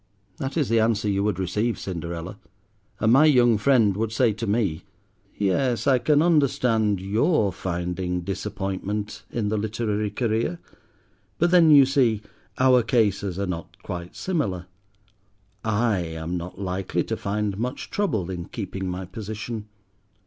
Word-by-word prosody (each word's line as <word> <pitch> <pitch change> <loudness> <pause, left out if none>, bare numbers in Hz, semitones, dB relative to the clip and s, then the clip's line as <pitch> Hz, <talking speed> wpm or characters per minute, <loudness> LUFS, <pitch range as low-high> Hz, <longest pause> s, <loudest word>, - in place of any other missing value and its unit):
That 135 +4 -4
is 150 - +2
the 115 0 +3
answer 110 -1 +1
you 100 -1 +1
would 105 -4 0
receive, 105 +5 -1
Cinderella; 85 +1 -5 0.6
and 110 +1 +3
my 145 +4 +7
young 120 -7 +5
friend 110 -5 +4
would 110 +1 -1
say 115 -1 +2
to 115 +2 -5
me, 100 -6 0 0.6
"Yes, 115 +5 +1
I 135 -3 +4
can 150 +4 +3
understand 125 - +2
your 105 - +1
finding 90 0 -3
disappointment 100 +2 -4
in 110 -3 -2
the 110 - 0
literary 105 0 -1
career; 110 -4 -1 0.8
but 175 +1 +2
then, 175 -3 +6
you 145 -3 +8
see, 125 -6 +2 0.3
our 130 -1 +5
cases 100 -5 +1
are 100 - -1
not 85 -3 -6
quite 85 0 -6
similar. 105 - -2 1.0
I 110 -1 +1
am 80 0 -4
not 90 +2 -6
likely 95 -1 -2
to - - -3
find 100 0 -2
much 125 +4 -4
trouble 110 - -1
in 85 -2 -5
keeping 95 -2 -5
my 90 +1 -4
position. 110 +2 -6
105 Hz, 145 wpm, -24 LUFS, 95-120 Hz, 1.0 s, you